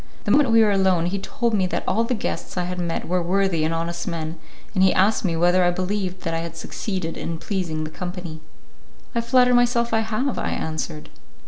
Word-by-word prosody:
The - - 0
moment 290 -4 +5
we 225 -1 +6
were 210 - +3
alone, 190 -4 +3
he 195 +3 -1
told 235 +4 -1
me 190 -3 +2
that - - -2
all 215 +5 +2
the 245 +2 -1
guests 210 - -4
I 180 - +1
had 180 0 -4
met 170 -1 -2
were 180 +1 +1
worthy 180 -2 +1
and 160 - +1
honest 170 +1 -3
men, 165 -2 -4 0.3
and 190 - +1
he 190 - +6
asked 195 +4 +3
me 170 -4 0
whether 175 +2 +4
I 175 - +4
believed 185 +1 -2
that 165 - -2
I 165 - 0
had 165 0 -6
succeeded 175 -1 -4
in 165 - -4
pleasing 170 -4 -2
the 155 - -5
company. 175 -2 -6 0.7
"I 235 - +1
flatter 250 +1 +4
myself 240 -1 +3
I 225 - +4
have," 225 +4 -1
I - - -1
answered. 155 -1 -4
185 Hz, 220 wpm, -23 LUFS, 170-215 Hz, 0.7 s, we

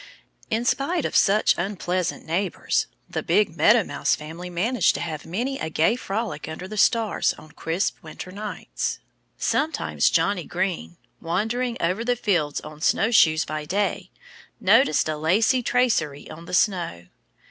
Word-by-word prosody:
In 230 +1 -1
spite 280 +5 0
of - - -3
such 210 +2 +4
unpleasant 180 -1 -2
neighbors, 180 +4 -1 0.2
the - - -3
big 205 -6 +2
Meadow 215 +5 +5
Mouse - - 0
family 165 +4 -8
managed 190 +5 +1
to - - -3
have 160 -3 -5
many 245 +10 -2
a 160 - -3
gay 160 +8 +2
frolic 215 -9 -4
under 160 +4 -6
the 215 - -7
stars 225 +1 +2
on 155 - -14
crisp 165 +7 -2
winter 160 +3 -9
nights. 210 +2 -4 0.4
Sometimes 315 +2 +1
Johnnie 200 -4 +1
Green, 175 - -3 0.2
wandering 225 +8 -1
over 180 +7 0
the 245 +1 +1
fields 175 -11 0
on 155 0 -11
snow 220 +7 +2
shoes 155 -8 +5
by 155 0 -4
day, 200 +7 -1 0.5
noticed 210 - +4
a 155 -1 -2
lacy 205 - +2
tracery 220 - 0
on 165 +2 -10
the 180 - -2
snow. 175 - 0
185 Hz, 150 wpm, -24 LUFS, 160-225 Hz, 0.5 s, Meadow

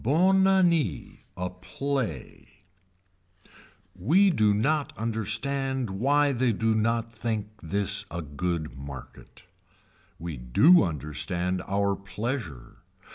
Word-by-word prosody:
BONNE 185 - +4
ANNEE 170 - +1 0.2
A 90 0 -3
PLAY 110 - -4 1.5
We 170 - +4
do 110 -9 +3
not 140 +8 0
understand 125 +3 -2
why 140 +8 +2
they 125 -2 +1
do 110 +2 +1
not 115 +1 0
think 110 -2 -3
this 100 +3 0
a 85 +1 -5
good 80 +2 -3
market. 70 -1 -11 0.7
We 85 -3 -6
do 100 - +5
understand 85 +4 -2
our 100 0 +1
pleasure. 100 - -5
110 Hz, 100 wpm, -27 LUFS, 90-135 Hz, 1.5 s, do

